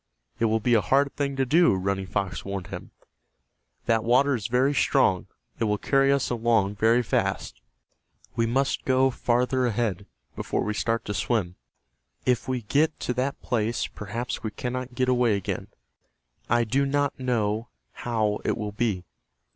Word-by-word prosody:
"It 115 - +2
will 110 0 +2
be 120 +2 +1
a 110 - +5
hard 135 +8 +2
thing 140 -1 -1
to 135 0 +1
do," 165 - +4
Running 95 0 -2
Fox 95 -2 -2
warned 100 -2 -5
him. - - -7 1.0
"That 115 -2 +2
water 130 +4 +4
is 110 -4 -2
very 130 +4 +2
strong. 130 -10 +2 0.3
It 115 - +1
will 105 -1 +1
carry 135 +4 +3
us 140 -2 +1
along 110 -4 +1
very 115 +3 +4
fast. - - -1 0.7
We 115 0 +1
must 135 +4 0
go 130 0 +3
farther 125 +1 +1
ahead, 105 -4 -1 0.3
before - - -2
we 105 - -1
start 115 +2 -1
to 105 - -3
swim. 100 -6 -1 0.7
If 125 -2 +1
we 130 -2 -2
get 150 +8 +1
to 125 - -1
that 130 +3 -2
place 115 -1 0
perhaps 115 +4 -5
we 110 - -3
cannot 125 +2 -5
get 130 +1 +1
away 125 -4 +3
again. 100 - -3 0.8
I 120 0 +3
do 130 +5 +1
not 145 0 0
know 115 -3 0 0.2
how 110 -3 -1
it - - 0
will 105 -1 -3
be. 105 -4 -1
120 Hz, 165 wpm, -26 LUFS, 105-130 Hz, 1.0 s, a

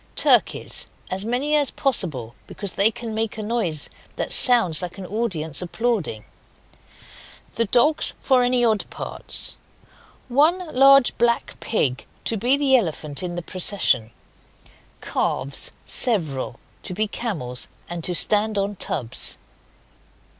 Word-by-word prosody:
Turkeys, - - +2 0.2
as 190 +1 -2
many 260 +6 0
as 290 -2 +2
possible, 155 - 0
because 200 -3 -5
they 200 +3 +4
can 225 0 -7
make 220 -1 -3
a 215 - -5
noise 205 -10 +1 0.3
that - - -3
that - - -5
sounds 230 - +7
like 180 +1 -6
an 190 - -7
audience 185 -8 -1
applauding 180 - -2 1.3
The 230 - 0
dogs, 250 +9 +2
for 260 -2 +2
any 245 0 +3
odd 220 -3 0
parts. - - -2 0.7
1 310 +7 +1
Large 275 0 +5
black 235 0 0
pig 135 - -1 0.2
to 230 - -1
be 245 +6 +2
the 280 -2 +3
Elephant 155 - -1
in 175 -1 -4
the 175 - -5
procession. 185 - 0 0.9
Calves 135 +1 -2
(several) 155 - -1 0.2
to 180 - -6
be 215 +2 0
camels, 155 - -2 0.2
and 170 -1 -6
to 180 - 0
stand 210 +3 +1
on 200 0 -2
tubs. 120 -9 -2
210 Hz, 130 wpm, -22 LUFS, 170-245 Hz, 1.3 s, sounds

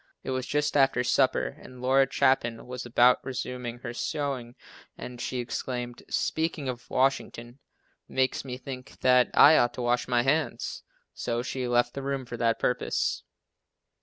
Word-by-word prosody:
It - - -4
was 130 -1 -2
just 150 0 0
after 135 -3 +3
supper - - +1
and 130 -1 -12
Laura 135 +2 +3
Chapin 130 -5 +1
was 125 0 -6
about 120 +1 +4
resuming 125 -2 -5
her 120 -2 -5
sewing 135 -3 -3 0.4
and 125 -1 -8
she 130 - -3
exclaimed, 120 0 -4
"Speaking 160 -3 -1
of 125 -1 -6
Washington, 130 -1 -1 0.5
makes 130 0 0
me 125 -2 -6
think 130 -1 -9
that 125 -1 +5
I 155 +2 +8
ought 120 0 +2
to 125 - -4
wash 120 0 +1
my 120 -1 +2
hands," 145 +4 -1 0.3
so 120 0 -2
she 130 0 -3
left 120 0 +2
the 140 - -5
room 135 -1 -3
for 120 - -7
that 115 -1 +1
purpose. - - 0
125 Hz, 160 wpm, -27 LUFS, 120-135 Hz, 0.5 s, I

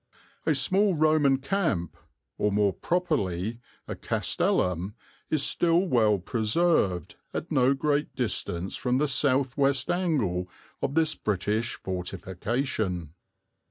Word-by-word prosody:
A 155 - +4
small 190 +8 +2
Roman 155 -3 +4
camp, 140 - -1 0.4
or 105 - +2
more 100 -1 +2
properly 115 - -1 0.3
a - - -4
castellum, 90 +3 -1 0.3
is 155 -3 +1
still 170 0 +3
well 115 - +3
preserved 110 - 0 0.2
at 170 - -4
no 135 -2 +3
great 145 +1 0
distance 95 -6 -2
from 125 0 0
the 150 +2 +2
south 135 -1 +2
west 140 +3 +2
angle 130 - 0 0.3
of 140 - -2
this 160 -1 +3
British 105 +3 -1
fortification." 95 - -3
130 Hz, 115 wpm, -27 LUFS, 100-155 Hz, 0.4 s, A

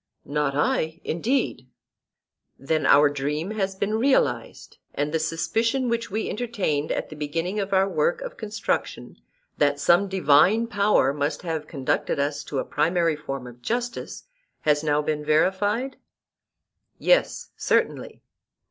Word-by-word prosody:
Not 145 -1 -1
I, 160 +2 0
indeed. 215 - -1 0.9
Then 155 +3 0
our 145 +1 +7
dream 145 +6 -2
has 195 -3 -2
been 210 +3 -1
realized; 265 +3 0 0.2
and 145 +1 -1
the 160 - +2
suspicion 230 +11 0
which 230 0 -1
we 215 +3 -2
entertained 200 -11 -2
at - - -2
the 155 - -9
beginning 165 +7 -3
of 200 -1 -3
our 190 0 +3
work 170 -2 0
of - - -6
construction, 220 0 -3 0.4
that 145 -1 +2
some 175 +7 +4
divine 190 +4 +4
power 200 - +2
must 145 +3 -2
have 160 -3 -3
conducted 135 -5 -1
us 145 +1 -1
to 140 - -4
a - - -1
primary 165 +1 +1
form 135 -3 -6
of 120 0 -12
justice, 240 - -3 0.4
has 150 0 +2
now 150 -1 +1
been 150 0 -2
verified? 205 - +1 1.0
Yes, - - +1
certainly. - - -1
165 Hz, 140 wpm, -24 LUFS, 145-210 Hz, 1.0 s, our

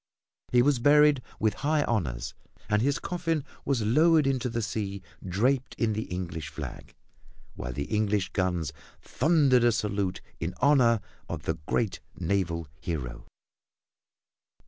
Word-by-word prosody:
He 120 -1 +5
was 140 -2 +3
buried 145 +1 +5 0.2
with 110 -2 +2
high 150 +1 +2
honors, 80 - -2 0.3
and 105 0 +2
his 140 +3 +2
coffin 165 -4 -2 0.2
was 135 -5 +1
lowered 155 +7 +4
into 130 -2 0
the 115 0 -2
sea 100 -2 -3 0.2
draped 125 +8 0
in 110 -2 +1
the 110 +2 -2
English 85 -4 -5
flag, - - -8 0.6
while 60 - -5
English 105 +4 0
guns 90 -5 -1 0.3
thundered 140 -4 +3
a 120 - +5
salute 100 -3 -1 0.2
in 85 +2 -3
honor 125 -5 +4 0.3
of - - -4
the - - -2
great 110 -5 0 0.2
naval 85 -3 -1
hero. 70 -9 -5
110 Hz, 130 wpm, -28 LUFS, 95-135 Hz, 0.6 s, He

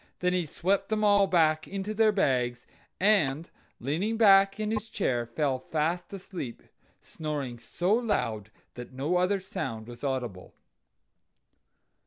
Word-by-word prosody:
Then 180 0 0
he 180 -3 0
swept 190 +7 0
them 215 -1 0
all 205 -1 +5
back 155 -3 +2
into 200 +2 -4
their 220 0 +4
bags, 125 - 0 0.3
and 170 -7 +2 0.3
leaning 175 - -1
back 195 -2 +6
in 215 0 -1
his 220 0 -3
chair 125 - -1
fell 130 +1 -1
fast 165 +6 -2
asleep, 185 -10 -7 0.4
snoring 145 -6 -5
so 175 - -1
loud 115 - 0 0.2
that 125 +1 -9
no 145 +7 0
other 185 +3 +2
sound 115 -11 -5
was 120 +1 -11
audible. 125 -9 -4
170 Hz, 135 wpm, -28 LUFS, 130-200 Hz, 0.4 s, back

